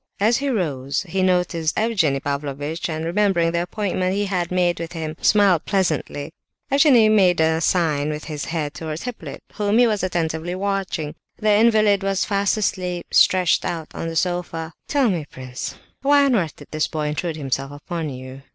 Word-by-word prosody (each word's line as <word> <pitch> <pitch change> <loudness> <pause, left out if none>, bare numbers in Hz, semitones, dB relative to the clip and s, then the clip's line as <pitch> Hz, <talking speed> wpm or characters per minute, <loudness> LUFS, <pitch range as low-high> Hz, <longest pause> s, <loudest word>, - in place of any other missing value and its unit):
As 220 +4 +3
he 280 0 -1
rose 145 - -1
he 190 +3 -1
noticed 180 -3 +1
Evgenie 195 -12 +1
Pavlovitch, 145 +4 -3
and, 160 0 -3
remembering 175 -2 +2
the 170 0 0
appointment 185 0 -1
he 205 0 0
had 180 -3 -1
made 180 -2 +1
with 165 0 -5
him, 160 -2 -4
smiled 195 -6 +4
pleasantly. 160 -5 -1 0.4
Evgenie 275 -6 +6
Pavlovitch 215 0 +4
made 180 -4 +4
a 160 0 +2
sign 155 -4 +1
with 150 0 -4
his 150 -3 -5
head 155 -3 -3
towards 160 -1 -5
Hippolyte, 250 -2 -7
whom 210 0 +1
he 245 - +6
was 215 -3 +1
attentively 170 -1 -2
watching. 190 -6 -2 0.2
The 215 -1 +2
invalid 215 -2 +4
was 195 0 0
fast 200 +1 +1
asleep, 180 -4 -2
stretched 185 -3 +4
out 165 -2 -4
on 165 - -4
the 165 - -5
sofa. 170 -2 -2
"Tell 280 -4 +2
me, 170 -8 -1
prince, 130 -1 -7 0.3
why 285 +1 +4
on 270 - +2
earth 170 -8 -1
did - - -14
this 155 0 0
boy 150 -2 -2
intrude 160 +2 -3
himself 135 -1 -2
upon 160 +2 -5
you?" 130 0 -9
175 Hz, 180 wpm, -22 LUFS, 155-200 Hz, 0.4 s, Evgenie